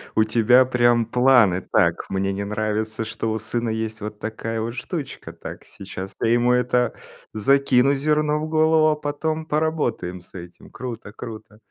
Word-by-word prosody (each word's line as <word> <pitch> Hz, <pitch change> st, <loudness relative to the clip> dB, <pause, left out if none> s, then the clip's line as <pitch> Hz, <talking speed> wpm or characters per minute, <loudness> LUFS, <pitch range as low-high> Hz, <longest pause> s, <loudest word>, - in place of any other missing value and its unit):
У 110 Hz, -, +5 dB
тебя 115 Hz, +3 st, +5 dB
прям 120 Hz, -2 st, +3 dB
планы: 125 Hz, -8 st, +4 dB
"Так, -, -, +2 dB
мне 95 Hz, 0 st, 0 dB
не 100 Hz, +1 st, -3 dB
нравится, 110 Hz, +1 st, -2 dB
что 110 Hz, 0 st, -3 dB
у 110 Hz, -, -2 dB
сына 115 Hz, +1 st, -2 dB
есть 110 Hz, 0 st, -3 dB
вот 105 Hz, 0 st, -6 dB
такая 110 Hz, +1 st, -4 dB
вот 115 Hz, +1 st, -4 dB
штучка. 140 Hz, +1 st, -6 dB
Так, -, -, -9 dB
сейчас 95 Hz, 0 st, -8 dB
я -, -, +2 dB
ему, 120 Hz, +1 st, +3 dB
это, 125 Hz, 0 st, +1 dB, 0.4 s
закину 135 Hz, +3 st, +3 dB
зерно 150 Hz, +1 st, +1 dB
в 155 Hz, -, -3 dB
голову, 155 Hz, 0 st, +3 dB
а 150 Hz, -, +1 dB
потом 155 Hz, +2 st, -3 dB
поработаем 150 Hz, -, -1 dB
с 90 Hz, -, -20 dB
этим". 85 Hz, -1 st, -11 dB
Круто 120 Hz, -5 st, -7 dB
круто. 110 Hz, -2 st, -10 dB
120 Hz, 165 wpm, -22 LUFS, 110-140 Hz, 0.4 s, У